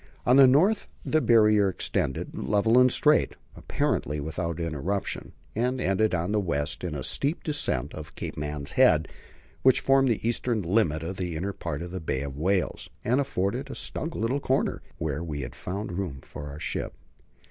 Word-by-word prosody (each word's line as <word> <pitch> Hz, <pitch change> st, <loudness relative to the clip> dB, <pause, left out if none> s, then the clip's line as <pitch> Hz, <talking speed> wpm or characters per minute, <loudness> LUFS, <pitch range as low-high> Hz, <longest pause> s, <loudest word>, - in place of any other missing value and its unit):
On 125 Hz, -, +5 dB
the 135 Hz, -1 st, +9 dB
north 185 Hz, +12 st, +3 dB, 0.2 s
the 155 Hz, -, +2 dB
Barrier 105 Hz, -5 st, +5 dB
extended, 65 Hz, -7 st, -2 dB
level 105 Hz, -, +3 dB
and 125 Hz, 0 st, +6 dB
straight, 150 Hz, +4 st, +3 dB, 0.2 s
apparently 75 Hz, +1 st, -1 dB
without 85 Hz, +3 st, -3 dB
interruption, 85 Hz, +4 st, -3 dB, 0.2 s
and 125 Hz, +3 st, 0 dB
ended 95 Hz, 0 st, +2 dB
on 85 Hz, +3 st, -1 dB
the 105 Hz, -, +2 dB
west 75 Hz, -6 st, -2 dB
in 90 Hz, -3 st, -3 dB
the 70 Hz, -3 st, -4 dB
steep 145 Hz, -, -1 dB
descent 145 Hz, -, -1 dB
of -, -, -9 dB
Cape -, -, -5 dB
Man's 75 Hz, -1 st, -4 dB
Head, -, -, +4 dB, 0.5 s
which 130 Hz, -1 st, +5 dB
formed 135 Hz, -1 st, +4 dB
the 115 Hz, -1 st, 0 dB
eastern 120 Hz, -2 st, 0 dB
limit 85 Hz, -4 st, +1 dB
of 90 Hz, +3 st, -5 dB
the 90 Hz, -3 st, -3 dB
inner 95 Hz, +5 st, -2 dB
part -, -, -4 dB
of 90 Hz, -, -7 dB
the 95 Hz, -1 st, -5 dB
Bay 65 Hz, -4 st, -2 dB
of 70 Hz, -1 st, -6 dB
Whales, 90 Hz, +5 st, 0 dB, 0.2 s
and 125 Hz, +5 st, +3 dB
afforded 125 Hz, +2 st, -2 dB
a -, -, -6 dB
snug 160 Hz, +1 st, -4 dB
little 120 Hz, +6 st, 0 dB
corner, 135 Hz, -1 st, 0 dB, 0.2 s
where 80 Hz, +1 st, -2 dB
we 75 Hz, -4 st, -4 dB
had 60 Hz, -1 st, -6 dB
found 100 Hz, -, -5 dB
room 85 Hz, -7 st, -4 dB
for 75 Hz, -, -8 dB
our 70 Hz, +1 st, -8 dB
ship. -, -, -3 dB
95 Hz, 180 wpm, -27 LUFS, 80-125 Hz, 0.5 s, the